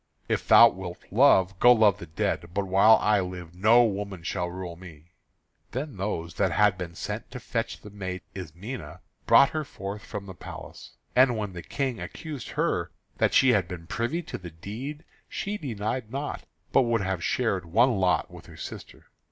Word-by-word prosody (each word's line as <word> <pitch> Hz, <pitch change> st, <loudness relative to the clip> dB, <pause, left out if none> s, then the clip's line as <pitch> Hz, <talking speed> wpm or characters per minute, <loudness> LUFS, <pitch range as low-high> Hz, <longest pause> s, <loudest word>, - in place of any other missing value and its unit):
"If -, -, -1 dB
thou 115 Hz, -, +9 dB
wilt 90 Hz, -3 st, -7 dB
love, 95 Hz, -6 st, +4 dB
go 120 Hz, -, +7 dB
love 105 Hz, -4 st, +5 dB
the 85 Hz, -, -8 dB
dead. 80 Hz, +1 st, -2 dB
But 100 Hz, 0 st, 0 dB
while 95 Hz, +4 st, +6 dB
I 105 Hz, -1 st, +3 dB
live 90 Hz, -2 st, -6 dB
no 110 Hz, +7 st, +5 dB
woman 100 Hz, -4 st, -4 dB
shall 90 Hz, 0 st, -2 dB
rule 90 Hz, -1 st, -6 dB
me." 85 Hz, -2 st, -14 dB, 0.6 s
Then 135 Hz, -2 st, -4 dB
those 85 Hz, -4 st, -3 dB
that 95 Hz, 0 st, +1 dB
had 105 Hz, -2 st, +4 dB
been 90 Hz, -2 st, -7 dB
sent -, -, -5 dB
to -, -, -7 dB
fetch -, -, -3 dB
the 105 Hz, -, -11 dB
maiden 95 Hz, -2 st, -6 dB
Ismené 95 Hz, -, -7 dB, 0.3 s
brought 140 Hz, -, +7 dB
her 155 Hz, -1 st, -2 dB
forth 100 Hz, -5 st, -7 dB
from 105 Hz, -2 st, -6 dB
the 95 Hz, -, -8 dB
palace. -, -, -10 dB, 0.2 s
And 125 Hz, -2 st, +5 dB
when 105 Hz, -3 st, -3 dB
the 85 Hz, -, -6 dB
King 130 Hz, +4 st, -3 dB
accused 150 Hz, -8 st, -7 dB
her -, -, 0 dB, 0.3 s
that -, -, +2 dB
she 130 Hz, -, +6 dB
had 100 Hz, -7 st, +3 dB
been 85 Hz, -2 st, -7 dB
privy 120 Hz, -, -2 dB
to -, -, -7 dB
the 90 Hz, -2 st, -8 dB
deed 115 Hz, -, -7 dB, 0.3 s
she 205 Hz, +1 st, -3 dB
denied 115 Hz, -3 st, -3 dB
not, 140 Hz, +3 st, -4 dB, 0.3 s
but -, -, +5 dB
would 115 Hz, -3 st, +1 dB
have 95 Hz, -3 st, -2 dB
shared 100 Hz, -8 st, 0 dB
one 115 Hz, +6 st, +3 dB
lot 90 Hz, -4 st, +1 dB
with -, -, -12 dB
her -, -, -13 dB
sister. -, -, -9 dB
100 Hz, 185 wpm, -27 LUFS, 90-120 Hz, 0.6 s, thou